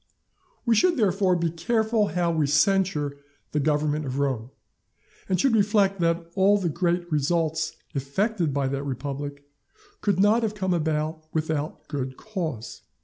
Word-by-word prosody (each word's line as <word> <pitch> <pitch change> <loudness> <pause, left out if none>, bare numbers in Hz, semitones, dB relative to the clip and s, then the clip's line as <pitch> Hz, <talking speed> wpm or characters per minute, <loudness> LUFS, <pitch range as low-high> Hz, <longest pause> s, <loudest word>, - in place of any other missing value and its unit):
We 235 - +4
should, 340 - +3
therefore, 195 -4 +2
be 170 -1 0
careful 220 +4 +1
how 170 0 0
we 155 -3 +1
censure 150 -2 +2 0.3
the 150 - 0
government 150 +1 +1
of 130 +1 -3
Rome, 130 -5 -1 0.8
and 185 -2 +1
should 245 +3 +3
reflect 200 -2 +3
that 170 0 +1
all 200 +1 +4
the 185 -4 -1
great 175 +1 -1
results 160 +1 0 0.2
effected 165 - 0
by 140 -1 0
that 140 0 -2
republic, 140 +1 -5 0.6
could 200 -3 +1
not 210 +4 +4
have 215 -2 -1
come 190 -3 0
about 155 -1 -1
without 155 -1 -2
good 130 -3 -4
cause. 160 - -5
165 Hz, 145 wpm, -25 LUFS, 145-195 Hz, 0.8 s, We